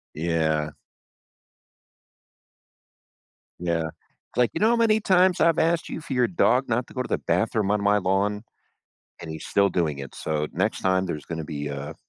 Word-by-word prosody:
Yeah. 80 Hz, -2 st, 0 dB, 2.9 s
Yeah. 85 Hz, -2 st, -1 dB, 0.5 s
Like, 125 Hz, -1 st, +3 dB
"You -, -, -2 dB
know 220 Hz, +2 st, +4 dB
how 235 Hz, -, +3 dB
many 220 Hz, -2 st, +3 dB
times 185 Hz, -2 st, +3 dB
I've 165 Hz, -1 st, +4 dB
asked 165 Hz, +1 st, +1 dB
you -, -, -5 dB
for 155 Hz, -3 st, -8 dB
your 125 Hz, -1 st, +3 dB
dog 125 Hz, +7 st, +2 dB
not 120 Hz, +1 st, 0 dB
to -, -, -14 dB
go 130 Hz, -, -1 dB
to -, -, -8 dB
the -, -, 0 dB
bathroom 105 Hz, -2 st, 0 dB
on 105 Hz, -1 st, +1 dB
my 105 Hz, +1 st, +3 dB
lawn? 100 Hz, +2 st, 0 dB, 0.8 s
And 80 Hz, -, -7 dB
he's 80 Hz, -, -7 dB
still 100 Hz, 0 st, +3 dB
doing 80 Hz, -7 st, -1 dB
it, 70 Hz, -, -8 dB
so 75 Hz, -1 st, -2 dB
next -, -, -1 dB
time, 95 Hz, 0 st, +1 dB
there's 75 Hz, -4 st, -5 dB
gonna 80 Hz, -1 st, -5 dB
be 75 Hz, -2 st, -5 dB
a 70 Hz, 0 st, -5 dB
95 Hz, 175 wpm, -25 LUFS, 80-130 Hz, 2.9 s, know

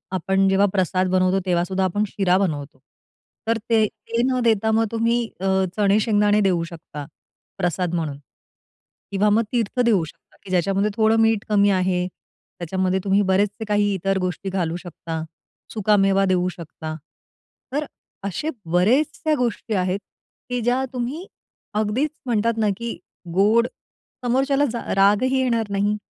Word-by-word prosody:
आपण 195 Hz, +2 st, +2 dB
जेव्हा 195 Hz, +1 st, +4 dB
प्रसाद 185 Hz, -1 st, +1 dB
बनवतो 185 Hz, +1 st, +2 dB
तेव्हासुद्धा 180 Hz, +1 st, 0 dB
आपण 205 Hz, +3 st, 0 dB
शिरा 190 Hz, -2 st, +2 dB
बनवतो. 145 Hz, -8 st, -2 dB, 0.7 s
तर 230 Hz, -, +2 dB
ते 220 Hz, -2 st, +4 dB
ते 225 Hz, +2 st, -4 dB
न 255 Hz, -1 st, +1 dB
देता 220 Hz, -1 st, +2 dB
मग 225 Hz, +1 st, +3 dB
तुम्ही 230 Hz, +1 st, +1 dB, 0.5 s
चणे 205 Hz, 0 st, +3 dB
शेंगदाणे 210 Hz, -1 st, +3 dB
देऊ 180 Hz, -4 st, +2 dB
शकता 160 Hz, -3 st, -8 dB, 0.5 s
प्रसाद 180 Hz, -1 st, -1 dB
म्हणून. 155 Hz, -4 st, -2 dB, 0.9 s
किंवा 200 Hz, +2 st, +2 dB
मग 220 Hz, +2 st, +3 dB
तीर्थ 240 Hz, 0 st, -1 dB
देऊ 205 Hz, -7 st, +3 dB
शकता, 150 Hz, -, -17 dB
की 190 Hz, -, -12 dB
ज्याच्यामध्ये 195 Hz, +3 st, +1 dB
थोडं 220 Hz, 0 st, +3 dB
मीठ 225 Hz, -2 st, +3 dB
कमी 205 Hz, -1 st, +4 dB
आहे, 185 Hz, -2 st, +1 dB
त्याच्यामध्ये 185 Hz, +1 st, -4 dB
तुम्ही 200 Hz, 0 st, +3 dB
बरेचसे 205 Hz, +3 st, +1 dB
काही 205 Hz, -1 st, +2 dB
इतर 195 Hz, +1 st, 0 dB
गोष्टी 185 Hz, +1 st, -3 dB
घालू 175 Hz, -3 st, -1 dB
शकता, 165 Hz, -2 st, -6 dB, 0.5 s
सुकामेवा 195 Hz, -2 st, +3 dB
देऊ 185 Hz, -1 st, +2 dB
शकता. 160 Hz, -2 st, -7 dB, 0.8 s
तर 295 Hz, +1 st, 0 dB, 0.4 s
असे 200 Hz, -, -3 dB, 0.2 s
बरेचशा 295 Hz, -, +2 dB
गोष्टी 235 Hz, -2 st, -2 dB
आहेत, 185 Hz, 0 st, 0 dB, 0.5 s
की 245 Hz, -1 st, -1 dB
ज्या 245 Hz, +3 st, +1 dB
तुम्ही 260 Hz, +8 st, -3 dB, 0.5 s
अगदीच 215 Hz, +8 st, 0 dB, 0.2 s
म्हणतात 230 Hz, -1 st, +1 dB
ना, 215 Hz, -2 st, +2 dB
की 235 Hz, 0 st, -5 dB, 0.4 s
गोड 215 Hz, +6 st, +4 dB, 0.6 s
समोरच्याला 270 Hz, +3 st, +2 dB, 0.3 s
रागही 210 Hz, +7 st, +3 dB
येणार 230 Hz, -4 st, 0 dB
नाही 205 Hz, +1 st, +1 dB
200 Hz, 140 wpm, -22 LUFS, 185-225 Hz, 0.9 s, जेव्हा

